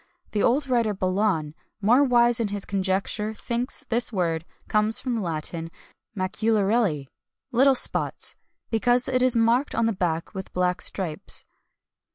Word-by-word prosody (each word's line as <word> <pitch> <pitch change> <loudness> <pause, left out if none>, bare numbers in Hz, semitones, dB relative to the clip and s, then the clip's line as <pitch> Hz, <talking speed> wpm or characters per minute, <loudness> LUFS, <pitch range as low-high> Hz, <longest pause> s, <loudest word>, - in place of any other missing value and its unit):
The 210 - -1
old 275 +4 +2
writer 235 -5 +1
Belon, 185 -5 -1 0.3
more 235 +7 +4
wise 240 -2 +3
in 230 - 0
his 200 -1 -3
conjecture, 200 +2 -2
thinks 240 +3 -4
this 240 +1 +1
word 165 -5 -1 0.2
comes 215 +1 +2
from 255 - -3
the 230 - -2
Latin, 165 -1 -4 0.5
macularelli, 200 - 0 0.5
"little 270 +3 +4
spots," - - +1 0.4
because 245 +3 +3
it 255 -1 +1
is 255 -1 +5
marked 235 +5 +2
on 230 - +1
the 225 - +1
back 170 -2 -2
with 190 -2 -8
black 180 0 0
stripes. 170 -6 +1
215 Hz, 145 wpm, -24 LUFS, 185-240 Hz, 0.5 s, is